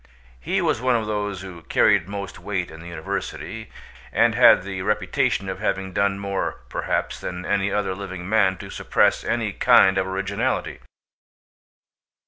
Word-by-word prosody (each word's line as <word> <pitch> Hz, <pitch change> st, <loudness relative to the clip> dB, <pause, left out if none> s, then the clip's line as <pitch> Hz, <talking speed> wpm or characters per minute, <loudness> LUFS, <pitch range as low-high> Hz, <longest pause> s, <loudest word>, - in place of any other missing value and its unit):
He 65 Hz, -, -1 dB
was -, -, +1 dB
one 125 Hz, -1 st, +2 dB
of 115 Hz, -2 st, 0 dB
those 105 Hz, -3 st, -3 dB
who 90 Hz, -3 st, -9 dB
carried 80 Hz, +1 st, +3 dB
most 100 Hz, -1 st, -6 dB
weight 95 Hz, -5 st, -3 dB
in 80 Hz, -, -11 dB
the 85 Hz, -, -10 dB
university, 85 Hz, +6 st, -5 dB, 0.4 s
and -, -, +3 dB
had -, -, +6 dB
the 95 Hz, -1 st, -5 dB
reputation 105 Hz, +3 st, 0 dB
of 95 Hz, -, -4 dB
having 95 Hz, -1 st, -2 dB
done 100 Hz, 0 st, +1 dB
more 100 Hz, -1 st, -3 dB
perhaps -, -, -2 dB
than 90 Hz, 0 st, -5 dB
any 100 Hz, 0 st, 0 dB
other 95 Hz, -2 st, 0 dB
living 95 Hz, -2 st, -7 dB
man 95 Hz, -3 st, +3 dB
to -, -, -9 dB
suppress -, -, +2 dB
any -, -, -1 dB
kind 95 Hz, 0 st, +5 dB
of 95 Hz, -, -1 dB
originality. 100 Hz, +6 st, -2 dB
100 Hz, 155 wpm, -23 LUFS, 95-105 Hz, 0.4 s, had